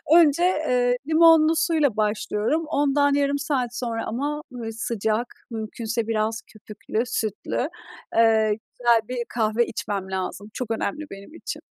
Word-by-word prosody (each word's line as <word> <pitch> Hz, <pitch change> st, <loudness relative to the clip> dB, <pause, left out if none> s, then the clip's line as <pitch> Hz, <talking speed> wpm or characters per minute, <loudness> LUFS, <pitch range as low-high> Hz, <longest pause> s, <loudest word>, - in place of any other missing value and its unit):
önce, 335 Hz, -1 st, +5 dB, 0.3 s
ııı, 245 Hz, -1 st, +3 dB
limonlu 325 Hz, 0 st, +6 dB
suyla 315 Hz, -7 st, +2 dB
başlıyorum. 215 Hz, +7 st, 0 dB
Ondan 285 Hz, -1 st, +2 dB
yarım 285 Hz, 0 st, +2 dB
saat 260 Hz, -5 st, -1 dB
sonra 230 Hz, -2 st, -2 dB
ama 290 Hz, +6 st, -2 dB, 0.3 s
sıcak, 220 Hz, 0 st, -1 dB, 0.2 s
mümkünse 225 Hz, 0 st, -3 dB
biraz 220 Hz, 0 st, 0 dB
köpüklü 215 Hz, +2 st, -4 dB
sütlü, 225 Hz, +4 st, -2 dB, 0.5 s
ııı, 220 Hz, -1 st, +5 dB, 0.3 s
güzel 235 Hz, -2 st, +5 dB
bir 250 Hz, 0 st, -4 dB
kahve 225 Hz, 0 st, +1 dB
içmem 200 Hz, -4 st, -4 dB
lazım. 190 Hz, +2 st, -4 dB
Çok 245 Hz, -3 st, -4 dB
önemli 300 Hz, +7 st, -2 dB
benim 195 Hz, +8 st, -10 dB
için. -, -, -6 dB
235 Hz, 130 wpm, -24 LUFS, 220-285 Hz, 0.5 s, limonlu